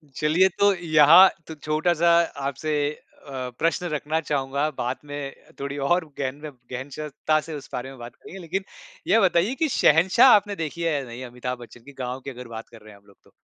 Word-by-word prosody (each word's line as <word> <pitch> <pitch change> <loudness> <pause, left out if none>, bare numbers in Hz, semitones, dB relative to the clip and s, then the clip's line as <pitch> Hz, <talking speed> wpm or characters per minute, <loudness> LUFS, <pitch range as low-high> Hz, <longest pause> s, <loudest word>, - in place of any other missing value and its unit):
चलिए 160 +5 +3
तो 200 0 +5
यहाँ 170 +2 +7 0.2
तो 160 - -8
छोटा-सा 155 +3 +1 0.4
आपसे 155 +3 -4 0.5
अ, 130 -2 -5
प्रश्न 165 +2 0
रखना 155 +1 -2
चाहूँगा, 140 0 -1
बाद 125 +2 -2
में 145 -1 -6 0.3
थोड़ी 140 +1 -5
और 175 +5 +1
गहन 135 -1 -2
में, 155 - -5 0.2
गहन 130 +3 -5
श 150 0 -5 0.2
ता 155 0 +4
से 160 - -9
उस 145 -1 -9
बारे 125 +2 -4
में 135 - -12
बात 120 0 -10
करेंगे। 195 - -12
लेकिन 185 +3 -3 0.4
यह 220 +4 +4
बताइए 190 +6 +2
कि 320 - +1
शहंशाह 185 - +5
आपने 205 0 0
देखी 165 0 -5
है 165 -2 +1
या 140 - -1
नहीं 120 +2 -8
अमिताभ 125 0 -6
बच्चन 120 0 -13
की? 140 +1 -14
गाँव 130 0 -5
की 140 - -7
अगर 125 -2 -9
बात 115 -1 -8
कर 115 -2 -15
रहे 105 -1 -14
हैं 100 - -17
हम 100 - -32
लोग 100 - -21
तो। - - -24
150 Hz, 215 wpm, -24 LUFS, 130-170 Hz, 0.5 s, यहाँ